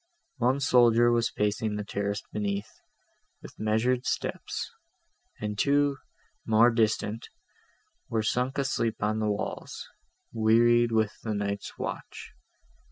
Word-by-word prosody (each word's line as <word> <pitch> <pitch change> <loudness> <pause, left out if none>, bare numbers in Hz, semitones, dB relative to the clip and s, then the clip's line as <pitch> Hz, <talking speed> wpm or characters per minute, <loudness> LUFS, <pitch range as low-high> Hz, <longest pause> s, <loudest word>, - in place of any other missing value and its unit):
One 125 +2 +2
soldier 120 -3 +5
was 120 0 +2
pacing 105 +1 -1
the 105 - -3
terrace 100 0 -3
beneath, 100 -1 -2 0.7
with - - -12
measured 120 +4 +1
steps; - - -3 0.7
and 105 -1 -4
two, 145 0 +2 0.5
more 115 +2 +5
distant, 110 -1 0 0.8
were 110 -1 0
sunk 125 +5 0
asleep 115 -6 -1
on 110 +1 0
the 110 -1 0
walls, 105 - -4 0.5
wearied 120 +1 +4
with 110 -2 +2
the 110 -2 -3
night's 100 0 -3
watch. - - -6
110 Hz, 115 wpm, -28 LUFS, 105-120 Hz, 0.8 s, soldier